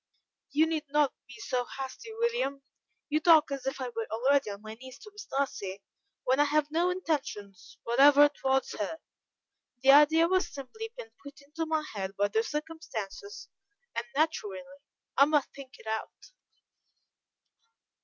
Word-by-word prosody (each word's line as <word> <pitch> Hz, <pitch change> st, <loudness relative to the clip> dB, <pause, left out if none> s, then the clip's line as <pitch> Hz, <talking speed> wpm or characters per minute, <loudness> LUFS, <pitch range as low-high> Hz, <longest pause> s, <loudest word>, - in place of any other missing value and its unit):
"You 305 Hz, +3 st, +3 dB
need 320 Hz, -2 st, -2 dB
not 295 Hz, -1 st, +2 dB
be -, -, -12 dB
so 250 Hz, -11 st, -1 dB
hasty, 270 Hz, +12 st, -6 dB
William. 460 Hz, -, -1 dB, 0.4 s
You 305 Hz, +1 st, +1 dB
talk 315 Hz, -2 st, +5 dB
as 270 Hz, -1 st, -4 dB
if 270 Hz, -, -2 dB
I 255 Hz, -1 st, -3 dB
were 230 Hz, -2 st, -4 dB
already 265 Hz, +3 st, +2 dB
on 200 Hz, +1 st, -8 dB
my 215 Hz, 0 st, -7 dB
knees 260 Hz, +3 st, -12 dB
to 425 Hz, -1 st, -14 dB
Miss 420 Hz, 0 st, -9 dB
Darcy, 200 Hz, -, -3 dB, 0.4 s
when 260 Hz, +2 st, +2 dB
I 290 Hz, -, +6 dB
have 300 Hz, 0 st, +1 dB
no 340 Hz, +3 st, +2 dB
intentions 275 Hz, -, -4 dB
whatever 280 Hz, +4 st, +7 dB
towards 265 Hz, -2 st, 0 dB
her; 210 Hz, +10 st, -2 dB, 0.9 s
the 270 Hz, -, +8 dB
idea 305 Hz, +3 st, +6 dB
has 370 Hz, +1 st, +2 dB
simply 440 Hz, +12 st, -7 dB
been 470 Hz, -2 st, -9 dB
put 280 Hz, -1 st, -12 dB
into 310 Hz, +3 st, -5 dB
my 315 Hz, -1 st, 0 dB
head 195 Hz, -1 st, -4 dB
by 205 Hz, 0 st, +2 dB
the 220 Hz, +2 st, +2 dB
circumstances, 320 Hz, -, -6 dB, 0.5 s
and 235 Hz, -, -3 dB
naturally 275 Hz, -9 st, 0 dB, 0.5 s
I 275 Hz, -, +8 dB
must 295 Hz, -2 st, +1 dB
think 275 Hz, -2 st, -12 dB
it -, -, -17 dB
out." 220 Hz, -, -5 dB
280 Hz, 155 wpm, -29 LUFS, 245-320 Hz, 0.9 s, the